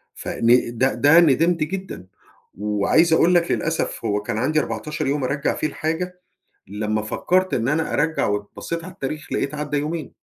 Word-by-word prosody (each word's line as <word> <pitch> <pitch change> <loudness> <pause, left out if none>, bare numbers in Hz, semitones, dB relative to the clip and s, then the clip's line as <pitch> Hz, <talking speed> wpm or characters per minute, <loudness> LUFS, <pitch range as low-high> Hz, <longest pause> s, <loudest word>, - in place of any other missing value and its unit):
فن 120 0 +1
ده، 130 +3 +2
ده 155 +4 +6
ندمت 165 +2 +3
جدًا. 185 - -6 0.5
وعايز 105 - +2
أقول 170 +2 +4
لك 170 -1 +2
للأسف 160 -6 -2
هو 105 -2 0
كان 105 - -4
عندي 155 +7 +1
14 150 +5 -3
يوم 140 0 0
أرجّع 140 +3 -1
فيه - - -1
الحاجة، 170 +4 -4 0.5
لما 105 +2 -2
فكّرت 185 +12 0
إن 115 0 0
أنا 150 +3 0
أرجّع 160 +2 +1
وبصّيت 105 +11 -4
على 185 +2 -9
التاريخ 155 -2 -6
لقيت 140 - -1
عدّى 150 0 -2
يومين. 155 +1 -4
150 Hz, 165 wpm, -22 LUFS, 115-165 Hz, 0.5 s, ده